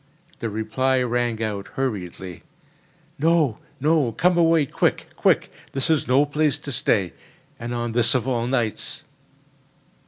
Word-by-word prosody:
The 115 Hz, -, -2 dB
reply 125 Hz, +5 st, 0 dB
rang 120 Hz, -2 st, 0 dB
out 100 Hz, -2 st, -3 dB
hurriedly: 95 Hz, -, -4 dB, 0.8 s
"No! 155 Hz, -6 st, +2 dB, 0.2 s
no! 145 Hz, -4 st, +2 dB
Come 180 Hz, +9 st, +3 dB
away 165 Hz, -3 st, +4 dB
quick—quick! -, -, +1 dB, 0.2 s
This 135 Hz, +3 st, 0 dB
is 155 Hz, -, +1 dB
no 135 Hz, +4 st, +4 dB
place 150 Hz, -1 st, +1 dB
to 145 Hz, -, -7 dB
stay, 100 Hz, -7 st, +1 dB, 0.5 s
and 120 Hz, +1 st, -5 dB
on 120 Hz, -1 st, -2 dB
this 120 Hz, +1 st, +2 dB
of 130 Hz, 0 st, 0 dB
all 120 Hz, -2 st, 0 dB
nights!" 120 Hz, -4 st, -2 dB
125 Hz, 130 wpm, -23 LUFS, 115-145 Hz, 0.8 s, away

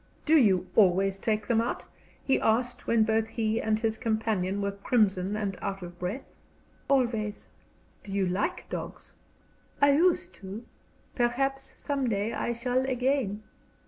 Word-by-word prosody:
"Do 320 Hz, -, +5 dB
you 200 Hz, -, +4 dB
always 195 Hz, -1 st, +4 dB
take 215 Hz, 0 st, -1 dB
them 230 Hz, -2 st, +3 dB
out?" 235 Hz, -, -3 dB, 0.4 s
he 270 Hz, -, +2 dB
asked, 245 Hz, +2 st, 0 dB
when 230 Hz, -1 st, +4 dB
both 220 Hz, 0 st, +1 dB
he 225 Hz, 0 st, -1 dB
and 220 Hz, 0 st, +1 dB
his 220 Hz, -1 st, -1 dB
companion 220 Hz, -4 st, 0 dB
were 200 Hz, 0 st, -1 dB
crimson 200 Hz, -2 st, +1 dB
and 200 Hz, -3 st, -2 dB
out 195 Hz, -1 st, -4 dB
of 175 Hz, 0 st, -10 dB
breath. 195 Hz, +10 st, -3 dB, 0.6 s
"Always." 230 Hz, -6 st, 0 dB, 0.5 s
"Do 200 Hz, -, -9 dB
you 195 Hz, -1 st, +1 dB
like 190 Hz, -, -2 dB
dogs?" -, -, -7 dB, 0.7 s
"I 285 Hz, 0 st, +6 dB
used 300 Hz, -, +2 dB
to. 200 Hz, +4 st, -7 dB, 0.5 s
Perhaps 270 Hz, +3 st, -1 dB
some 275 Hz, -3 st, -1 dB
day 210 Hz, +1 st, -1 dB
I -, -, -1 dB
shall 245 Hz, +2 st, 0 dB
again." 250 Hz, -5 st, 0 dB
220 Hz, 145 wpm, -28 LUFS, 200-245 Hz, 0.7 s, I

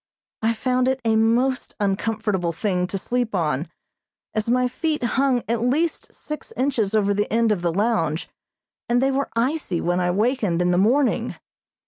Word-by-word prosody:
I 225 Hz, +1 st, +2 dB
found 250 Hz, +2 st, 0 dB
it 265 Hz, 0 st, +1 dB
a 225 Hz, -1 st, +3 dB
most 240 Hz, +4 st, +1 dB
uncomfortable 205 Hz, -2 st, 0 dB
thing 180 Hz, +1 st, -1 dB
to 195 Hz, -, -3 dB
sleep 240 Hz, +2 st, -1 dB
on, 155 Hz, -3 st, 0 dB, 0.7 s
as 215 Hz, +1 st, -1 dB
my 250 Hz, +1 st, +3 dB
feet 305 Hz, +3 st, -2 dB
hung 260 Hz, 0 st, +1 dB
at 230 Hz, 0 st, 0 dB
least 295 Hz, +7 st, 0 dB
six 300 Hz, -2 st, -7 dB
inches 235 Hz, -6 st, 0 dB
over 205 Hz, -1 st, +3 dB
the 205 Hz, +1 st, -1 dB
end 230 Hz, 0 st, +3 dB
of 200 Hz, -4 st, 0 dB
the 170 Hz, -1 st, +1 dB
lounge, 170 Hz, -5 st, 0 dB, 0.6 s
and 240 Hz, +1 st, +3 dB
they 270 Hz, +1 st, +2 dB
were 275 Hz, +1 st, -1 dB
icy 240 Hz, -, 0 dB
when 175 Hz, +1 st, 0 dB
I 180 Hz, -1 st, +1 dB
wakened 210 Hz, -2 st, +1 dB
in 180 Hz, 0 st, +2 dB
the 175 Hz, -, +3 dB
morning. 250 Hz, +7 st, +2 dB
225 Hz, 170 wpm, -23 LUFS, 190-255 Hz, 0.7 s, a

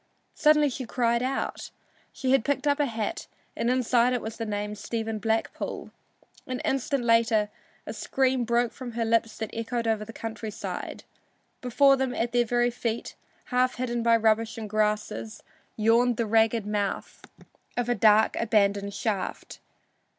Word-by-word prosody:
Suddenly 300 Hz, -1 st, +4 dB
she 255 Hz, -1 st, -5 dB
cried 235 Hz, 0 st, +1 dB
out 260 Hz, +2 st, -3 dB, 0.4 s
she 260 Hz, -, -2 dB
had 270 Hz, -4 st, +4 dB
picked 285 Hz, +2 st, -1 dB
up 285 Hz, 0 st, +2 dB
a 290 Hz, -, +2 dB
hat 225 Hz, +6 st, -4 dB, 0.3 s
and 235 Hz, -, 0 dB
inside 250 Hz, -1 st, +3 dB
it 245 Hz, -, -1 dB
was 220 Hz, 0 st, -6 dB
the 225 Hz, -, -4 dB
name 210 Hz, 0 st, -3 dB
"Stephen 220 Hz, +1 st, -4 dB
Blackpool." 220 Hz, +2 st, -2 dB, 0.6 s
An 255 Hz, -1 st, -3 dB
instant 270 Hz, 0 st, -1 dB
later 230 Hz, -2 st, +3 dB, 0.3 s
a -, -, -5 dB
scream 260 Hz, -2 st, 0 dB
broke 235 Hz, 0 st, +1 dB
from 250 Hz, -3 st, -8 dB
her 230 Hz, 0 st, -1 dB
lips 225 Hz, 0 st, +1 dB
that 220 Hz, -2 st, -4 dB
echoed 230 Hz, +1 st, -3 dB
over 220 Hz, -2 st, 0 dB
the 220 Hz, -, -9 dB
country 225 Hz, -1 st, -6 dB
side. 210 Hz, -, -6 dB, 0.6 s
Before 275 Hz, +2 st, +4 dB
them, 265 Hz, -1 st, -1 dB
at 235 Hz, +1 st, -1 dB
their 240 Hz, 0 st, +2 dB
very 240 Hz, +1 st, +1 dB
feet, 235 Hz, -1 st, -3 dB, 0.4 s
half 250 Hz, 0 st, +2 dB
hidden 240 Hz, -2 st, -2 dB
by 230 Hz, 0 st, +4 dB
rubbish 225 Hz, 0 st, +1 dB
and 220 Hz, -1 st, -5 dB
grasses, 215 Hz, +1 st, -2 dB, 0.3 s
yawned 230 Hz, +2 st, +3 dB
the 230 Hz, -, 0 dB
ragged 225 Hz, 0 st, +2 dB
mouth 205 Hz, -1 st, -3 dB, 0.5 s
of 245 Hz, -1 st, 0 dB
a 245 Hz, -, +2 dB
dark, 215 Hz, 0 st, +4 dB
abandoned 200 Hz, -3 st, +1 dB
shaft. 205 Hz, -5 st, -3 dB
230 Hz, 160 wpm, -27 LUFS, 220-245 Hz, 0.6 s, Suddenly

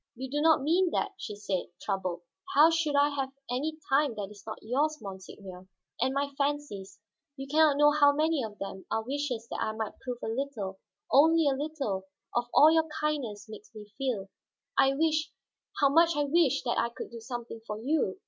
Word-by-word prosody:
"You 260 Hz, +2 st, -6 dB
do 295 Hz, +1 st, 0 dB
not 315 Hz, -3 st, +4 dB
mean 350 Hz, +5 st, +3 dB
that," 400 Hz, -, 0 dB
she 210 Hz, -, -7 dB
said, 200 Hz, -3 st, -3 dB
troubled. 185 Hz, -3 st, -3 dB, 0.3 s
"How 305 Hz, +3 st, +7 dB
should 325 Hz, -3 st, 0 dB
I 285 Hz, +1 st, +5 dB
have 270 Hz, -2 st, -3 dB, 0.2 s
any 300 Hz, +5 st, -2 dB
time 275 Hz, -2 st, +2 dB
that 205 Hz, -1 st, -5 dB
is 205 Hz, -2 st, -14 dB
not 220 Hz, -, -5 dB
yours, 290 Hz, +7 st, 0 dB
monseigneur? 190 Hz, -2 st, -10 dB, 0.3 s
And 260 Hz, +2 st, +2 dB
my 280 Hz, 0 st, 0 dB
fancies 280 Hz, -10 st, -2 dB, 0.4 s
you 270 Hz, -, -5 dB
can 300 Hz, +3 st, 0 dB
not 305 Hz, -3 st, +5 dB
know 295 Hz, 0 st, +6 dB
how 290 Hz, -1 st, +5 dB
many 310 Hz, 0 st, +1 dB
of 210 Hz, -2 st, -7 dB
them 195 Hz, -1 st, -7 dB
are 225 Hz, 0 st, -1 dB
wishes 255 Hz, -3 st, -3 dB
that -, -, -3 dB
I 220 Hz, -, -1 dB
might 220 Hz, -1 st, -5 dB
prove 250 Hz, -2 st, -5 dB
a -, -, -2 dB
little, 225 Hz, -6 st, -3 dB, 0.3 s
only 320 Hz, +3 st, +5 dB
a 280 Hz, -, +3 dB
little, 270 Hz, -10 st, -3 dB, 0.3 s
of 240 Hz, 0 st, +1 dB
all 310 Hz, +2 st, +7 dB
your 320 Hz, 0 st, +3 dB
kindness 275 Hz, -10 st, -2 dB
makes 215 Hz, -1 st, -11 dB
me 210 Hz, -1 st, -11 dB
feel. 230 Hz, -8 st, -2 dB, 0.5 s
I 270 Hz, 0 st, +4 dB
wish, 310 Hz, 0 st, +1 dB, 0.5 s
how 280 Hz, -, +5 dB
much 330 Hz, +3 st, +4 dB
I 295 Hz, -, +1 dB
wish, 300 Hz, 0 st, +2 dB
that 240 Hz, -2 st, 0 dB
I 235 Hz, -, +1 dB
could 235 Hz, -, -8 dB
do 235 Hz, -, -8 dB
something 235 Hz, -1 st, -7 dB
for 210 Hz, -, -4 dB
you!" 265 Hz, -5 st, 0 dB
270 Hz, 200 wpm, -29 LUFS, 215-295 Hz, 0.5 s, How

